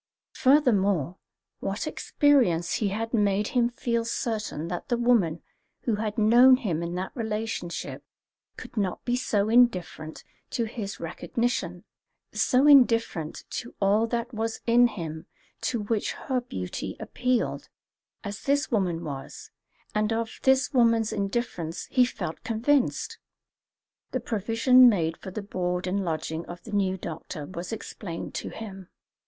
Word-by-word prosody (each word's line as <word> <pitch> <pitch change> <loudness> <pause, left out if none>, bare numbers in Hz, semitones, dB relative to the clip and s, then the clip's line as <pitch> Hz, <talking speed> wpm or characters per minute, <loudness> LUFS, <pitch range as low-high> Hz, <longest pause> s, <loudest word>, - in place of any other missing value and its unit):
Furthermore, 200 - +3 0.4
what - - -3
experience 235 - +2
he 210 - +2
had 225 +4 -3
made 205 -2 +2
him 240 -2 +2
feel 235 -1 -1
certain 220 -8 -3
that 175 0 -5
the 240 - +2
woman 225 -10 +2 0.4
who 235 - 0
had 215 +1 -3
known 240 +4 +7
him 185 - -2
in 170 +1 -3
that 185 +1 -3
relationship 220 -6 -4 0.5
could - - -10
not 195 -5 -2
be 245 - +1
so 210 -5 +1
indifferent 190 -9 +2 0.3
to 240 - -1
his 215 -3 -6
recognition, 175 +1 -2 0.5
so 255 +3 +3
indifferent 230 - +4
to 240 - -5
all 205 +3 +3
that 235 +1 -3
was 225 0 -2
in 240 +1 +6
him 165 -6 -6 0.3
to 240 - -1
which 210 0 -1
her 255 -2 -2
beauty 90 - -5
appealed, 250 -1 -1 0.5
as 205 -1 -6
this 285 +1 +1
woman 180 -6 0
was, 140 -4 -7 0.4
and 210 +1 +1
of 225 0 -2
this 265 +1 +3
woman's 230 -3 +3
indifference 195 -5 -3
he 250 -1 +5
felt 165 -9 -5
convinced. 245 +4 0 0.9
The - - +1
provision 230 +4 +5
made 165 -6 0
for 190 - -8
the 200 +2 -5
board 180 -2 -2
and 195 +2 -1
lodging 160 -1 -3
of 175 0 -9
the 225 - -10
new 190 -2 +1
doctor 160 -2 -6
was 180 +4 -7
explained 195 -5 -6
to - - -4
him. 195 -4 -9
215 Hz, 140 wpm, -27 LUFS, 180-240 Hz, 0.9 s, known